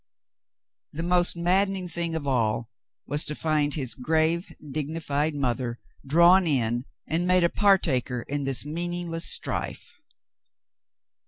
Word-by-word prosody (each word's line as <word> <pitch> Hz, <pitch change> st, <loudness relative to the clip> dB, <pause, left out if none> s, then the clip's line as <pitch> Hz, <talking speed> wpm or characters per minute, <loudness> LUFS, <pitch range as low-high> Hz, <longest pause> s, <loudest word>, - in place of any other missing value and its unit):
The 165 Hz, +3 st, -4 dB
most 175 Hz, 0 st, +2 dB
madden 190 Hz, +3 st, +2 dB
ing 185 Hz, -2 st, -5 dB
thing 170 Hz, -1 st, -3 dB
of 155 Hz, -3 st, -4 dB
all 115 Hz, -3 st, 0 dB, 0.3 s
was 145 Hz, +1 st, 0 dB
to 150 Hz, -, -2 dB
find 150 Hz, -2 st, 0 dB
his 130 Hz, -6 st, -1 dB
grave, 160 Hz, +5 st, 0 dB, 0.2 s
dignified 150 Hz, 0 st, -2 dB
mother 125 Hz, -3 st, -2 dB, 0.3 s
drawn 170 Hz, +5 st, +5 dB
in 120 Hz, -4 st, 0 dB, 0.2 s
and 170 Hz, +3 st, -1 dB
made 180 Hz, -1 st, +4 dB
a 170 Hz, -, +4 dB
partaker 140 Hz, -, +2 dB
in 145 Hz, 0 st, -3 dB
this 135 Hz, 0 st, +1 dB
meaningless 170 Hz, +1 st, -3 dB
strife. -, -, -1 dB
155 Hz, 130 wpm, -26 LUFS, 135-175 Hz, 0.3 s, drawn